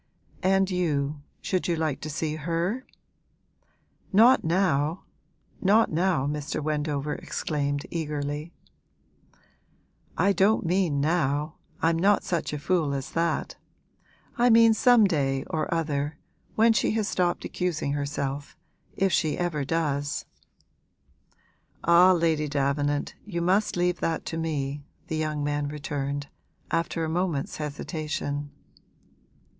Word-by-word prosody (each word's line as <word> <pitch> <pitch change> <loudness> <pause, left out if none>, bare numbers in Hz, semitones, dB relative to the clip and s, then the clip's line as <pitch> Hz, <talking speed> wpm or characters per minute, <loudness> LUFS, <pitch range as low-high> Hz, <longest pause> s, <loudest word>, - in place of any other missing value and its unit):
'And 190 0 +2
you, 150 -5 -1 0.2
should 185 -2 -1
you 170 - +1
like 155 -4 -2
to 155 - -5
see 155 +1 -2
her?' 170 - -2 1.2
'Not 230 +6 +6
now 165 -2 +1 0.6
not 210 +4 +4
now!' 165 -3 +1
Mr. 145 0 -3
Wendover 150 -1 -1
exclaimed, 145 -1 -2
eagerly. 150 -1 -3 1.7
'I 200 +4 +3
don't 195 +2 +3
mean 170 -5 +1
now, 150 -1 0 0.3
I'm 165 0 +3
not 200 +3 +3
such 170 -3 -2
a 150 - -3
fool 150 -2 0
as 135 -1 -5
that. 165 0 -1 0.8
I 245 +1 +5
mean 230 -1 +7
some 240 +1 +5
day 135 -7 0
or 160 - -1
other, 150 -2 -1 0.4
when 225 +1 +5
she 215 - +1
has 215 -2 0
stopped 175 -1 0
accusing 165 -5 -2
herself, 140 -1 -3 0.4
if 195 -1 +2
she 155 -3 +1
ever 170 -5 -1
does.' 145 -1 -1 1.6
'Ah, 175 +2 +7
Lady 165 -3 +1
Davenant, 145 0 0
you 180 -5 -4
must 190 +4 +1
leave 175 0 +1
that 165 -1 -1
to 165 - -4
me,' 145 -3 -2 0.3
the 160 - -1
young 155 -1 -1
man 145 0 -1
returned, 145 -1 -3 0.5
after 165 0 0
a - - -1
moment's 165 -3 -1
hesitation. 150 -1 -4
160 Hz, 120 wpm, -26 LUFS, 145-180 Hz, 1.7 s, mean